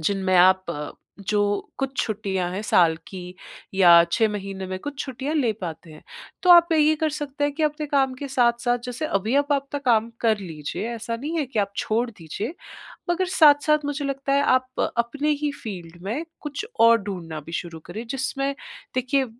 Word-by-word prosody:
जिनमें 190 +2 +1
आप 175 -5 +2 0.3
जो 210 - +1 0.4
कुछ 270 0 -3
छुट्टियाँ 195 -4 -2
हैं 190 - -3
साल 170 -6 +4
की 180 -1 -8 0.4
या 185 -2 +6 0.2
6 225 - +3
महीने 195 -2 -5
में 185 0 -4
कुछ 285 +3 -7
छुट्टियाँ 265 +3 -4
ले 255 -8 +2
पाते 165 -2 -7
हैं। 155 - -14 0.4
तो 365 - +4
आप 340 -1 +8
ये 310 -1 +4
कर 315 -1 +2
सकते 290 -1 -3
हैं 290 - 0
कि 315 - -2
अपने 300 0 0
काम 270 -2 +1
के 280 +2 -7
साथ-साथ 240 -1 +2
जैसे 250 +5 -3
अभी 215 0 -1
आप 285 +1 +2
आपका 280 0 -1
काम 235 -4 +2
कर 220 -2 +2
लीजिए, 165 +2 -5
ऐसा 230 0 -4
नहीं 305 +7 -3
है 295 - 0
कि 245 -3 -4
आप 200 0 -2
छोड़ 230 +3 0
दीजिए। 200 - -6 0.6
मगर 370 +2 0
साथ-साथ 300 -1 +5
मुझे 290 0 -2
लगता 275 0 -2
है 280 - +4
आप 255 -1 +1 0.2
अपने 280 +6 0
ही 295 - +1
फ़ील्ड 175 -6 -7
में 235 +12 -3 0.2
कुछ 295 +7 -5
और 230 0 +7
ढूँढना 175 -6 -5
भी 160 - -11
शुरू 170 -2 -10
करें 225 +3 -7
जिसमें 275 +2 -2 0.4
देखिए 260 +2 +1
240 Hz, 185 wpm, -24 LUFS, 195-285 Hz, 0.6 s, आप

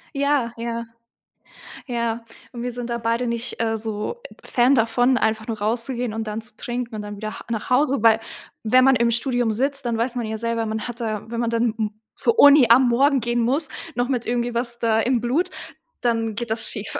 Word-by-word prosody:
Ja, 275 -4 +1
ja. 235 0 -4 1.0
Ja. 235 -2 -2 0.3
Und 240 -1 -6
wir 245 - -2
sind 245 0 -5
da 235 - -1
beide 230 +1 -1
nicht, 235 +1 -4
äh, 225 -1 0
so, 215 - -4
äh, - - -15
Fan 250 +2 +3
davon, 245 +2 +3
einfach 220 -1 0
nur 225 -3 -4
rauszugehen 235 +2 0
und 220 -1 -4
dann 215 +1 -4
zu 225 0 -9
trinken 240 -1 -4
und 210 - -4
dann 205 0 -7
wieder 215 +1 -6
H - - -12
nach 220 -2 -3
Hause, 275 +2 +3
weil 225 -1 +6 0.4
wenn 255 +4 +5
man 270 0 +5
im 235 -1 +2
Studium 245 -1 0
sitzt, 275 +4 -1
dann 235 -1 0
weiß 240 +2 -1
man 240 -2 -2
ja 220 0 -3
selber, 230 0 -1
man 220 0 -3
hat 240 0 -7
da 215 -3 -2
wenn 230 0 -4
man 235 -1 0
dann 230 -1 +1
m 215 -1 -1 0.2
zur 460 -1 +2
Uni 285 - +8
am 245 +2 +6
Morgen 270 +3 +3
gehen 240 +1 0
muss, 275 +6 +1 0.3
noch 245 +1 0
mit 245 -3 -1
irgendwie 240 0 -1
was 235 0 0
da 225 -1 +2
im 240 +1 +1
Blut, 295 +10 0 0.5
dann 225 -2 0
geht 235 0 -4
das 225 +1 -1
schief. 210 -1 -4
235 Hz, 220 wpm, -22 LUFS, 225-250 Hz, 1.0 s, Uni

